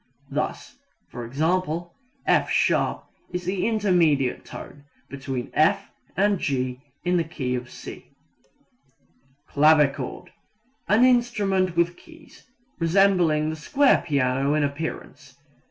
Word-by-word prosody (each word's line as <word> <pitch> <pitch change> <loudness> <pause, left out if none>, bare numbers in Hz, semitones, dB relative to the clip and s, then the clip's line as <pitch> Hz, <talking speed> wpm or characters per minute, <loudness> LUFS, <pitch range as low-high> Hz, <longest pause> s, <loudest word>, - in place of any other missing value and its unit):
Thus - - -4 0.3
e.g., 120 +3 -7 0.9
"F[sharp] - - +1 0.3
is 180 -1 -4
the 185 +2 -1
intermediate 175 - +2
tone 145 0 -11 0.3
between 135 -2 -5
F 200 +6 +2 0.3
and 200 0 +2
G 130 -3 -2 0.2
in 180 0 +2
the 170 - +2
key 135 -6 -4
of 125 -1 -4
C." - - -10 1.4
Clavichord 145 -3 +2 0.6
an 215 +4 +4
instrument 205 -8 +1
with 170 0 +1
keys, 325 -5 -18 0.3
resembling 165 -3 +3
the - - -5
square 275 - +2
piano 140 -1 +1
in 155 - +1
appearance. 140 -2 -5
160 Hz, 105 wpm, -24 LUFS, 140-195 Hz, 1.4 s, an